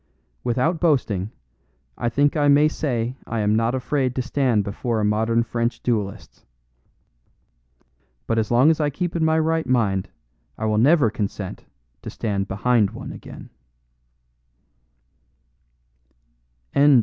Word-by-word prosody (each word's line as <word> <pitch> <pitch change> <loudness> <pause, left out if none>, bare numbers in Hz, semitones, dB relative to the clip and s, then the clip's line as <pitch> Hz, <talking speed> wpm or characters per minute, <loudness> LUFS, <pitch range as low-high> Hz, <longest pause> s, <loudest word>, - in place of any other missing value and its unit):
Without 130 +8 0
boasting, 120 - +1 0.7
I 120 - -1
think 145 +4 +2
I 145 -2 +2
may 145 +1 +5
say 125 -6 -2
I 115 -2 -2
am 105 +1 +2
not 115 +3 +1
afraid 130 0 -1
to 130 - -1
stand 125 -5 +1
before 110 +3 -2
a 105 - +1
modern 110 +2 +1
French 115 0 -2
duelist, 105 -5 -3 1.8
but 115 0 0
as 110 - -1
long 125 +6 +5
as 160 - -1
I 150 - +2
keep 175 +4 -3
in 165 - 0
my 160 0 +3
right 160 0 0
mind 105 -7 +1 0.5
I - - -3
will 110 -1 +1
never 140 -2 +4
consent 100 -3 -5 0.4
to - - -7
stand 100 -3 -2
behind 105 +2 +2
one - - -8
again. - - -11
120 Hz, 130 wpm, -22 LUFS, 110-145 Hz, 1.8 s, may